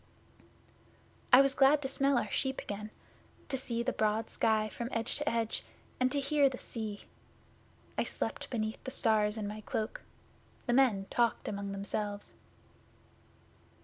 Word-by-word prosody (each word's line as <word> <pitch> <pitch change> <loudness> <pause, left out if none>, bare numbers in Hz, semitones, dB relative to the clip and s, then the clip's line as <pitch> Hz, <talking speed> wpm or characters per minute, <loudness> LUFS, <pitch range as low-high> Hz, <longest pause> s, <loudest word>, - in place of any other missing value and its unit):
'I 255 +1 +10
was 275 0 +3
glad 275 +2 +5
to - - 0
smell 275 0 +2
our - - -1
sheep 265 -1 0
again; 210 +1 -5 0.6
to 270 - 0
see 235 -3 -2
the 255 - 0
broad 215 +1 0
sky 215 -1 +2
from 235 +2 -5
edge 230 +1 -1
to 295 +1 0
edge, 230 -1 -1 0.4
and 255 0 +3
to 285 - +1
hear 280 0 +3
the 255 - -6
sea. 215 -5 -5 1.0
I - - +3
slept - - -3
beneath 220 -2 -3
the - - -4
stars 215 -3 +2
in 210 -2 -3
my 210 +1 -6
cloak. 215 +1 -3 0.6
The 240 - +1
men 240 -7 +4
talked 235 -1 +1
among 200 -1 -3
themselves. 205 +1 -4
230 Hz, 150 wpm, -32 LUFS, 215-265 Hz, 1.0 s, I